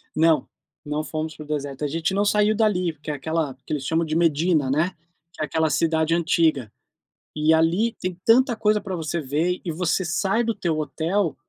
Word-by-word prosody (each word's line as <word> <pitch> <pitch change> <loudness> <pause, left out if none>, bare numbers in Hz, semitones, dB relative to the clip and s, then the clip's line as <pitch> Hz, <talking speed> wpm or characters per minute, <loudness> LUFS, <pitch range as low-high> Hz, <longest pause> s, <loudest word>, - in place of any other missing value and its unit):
Não, 160 -1 +3 0.4
não 150 +1 -2
fomos 155 0 -4
para 155 - -9
o - - -15
deserto. 145 -1 -3
A - - +1
gente 165 +5 -1
não 205 +1 +2
saiu 210 +1 +3
dali, 190 -6 +1
porque 150 0 -9
é - - -1
aquela 155 -1 -2
que - - -6
eles 140 -3 -2
chamam 165 +1 +1
de 155 0 -3
Medina, 160 -3 +2
né, 155 +6 +1 0.4
que - - -6
é - - +1
aquela 160 0 0
cidade 160 +2 +1
antiga. 160 - +1 0.7
E 155 +1 +3
ali, 175 +8 +2
tem 180 -1 -4
tanta 240 +1 +4
coisa 210 -1 +2
pra 190 -2 -4
você 165 +1 -3
ver. 160 +6 -1
E 170 - -3
você 180 +3 0
sai 195 +7 0
do 230 -1 -1
teu 165 -3 -1
hotel, 165 +1 -1
165 Hz, 205 wpm, -23 LUFS, 155-185 Hz, 0.7 s, tanta